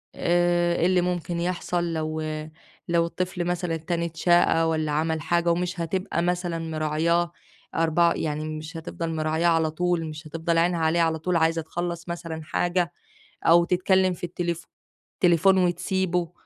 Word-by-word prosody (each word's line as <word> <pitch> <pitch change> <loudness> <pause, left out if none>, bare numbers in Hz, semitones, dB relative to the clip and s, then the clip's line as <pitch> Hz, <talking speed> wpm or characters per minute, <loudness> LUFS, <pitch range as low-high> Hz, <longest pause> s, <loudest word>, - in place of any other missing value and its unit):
آآ، 175 0 +2
إيه 170 - +1
اللي 185 0 +3
ممكن 175 -1 -2
يحصل 175 -1 -1
لو 155 0 -2 0.7
لو 170 -1 +2
الطفل 180 +1 -3
مثلًا 175 -1 -1
التاني 170 +1 -2
اتشاقى 165 0 +3
والّا 155 -1 0
عمل 160 +1 0
حاجة 170 +2 +1
ومش 180 +1 -1
هتبقى 170 +1 -1
مثلًا 175 -1 -1
مراعياه، 165 +2 0 0.4
أربع 165 +1 +3
يعني 155 0 -2
مش 160 +2 -8
هتفضل 165 0 -5
مراعياه 160 +2 +1
على 165 -2 +2
طول، 175 0 0
مش 155 0 -8
هتفضل 165 +2 -1
عينها 170 +1 +2
عليه 160 +1 +2
على 160 -1 +1
طول، 180 +2 -1
عايزة 165 0 +2
تخلّص 170 +1 -5
مثلًا 165 -2 -5
حاجة 175 +2 0 0.6
أو 170 +1 +7
تتكلّم 185 +1 +2
في 175 - -12
التليف 170 -1 -3 0.6
تليفون 180 +2 +5
وتسيبه، 180 -1 0
170 Hz, 150 wpm, -25 LUFS, 160-175 Hz, 0.7 s, أو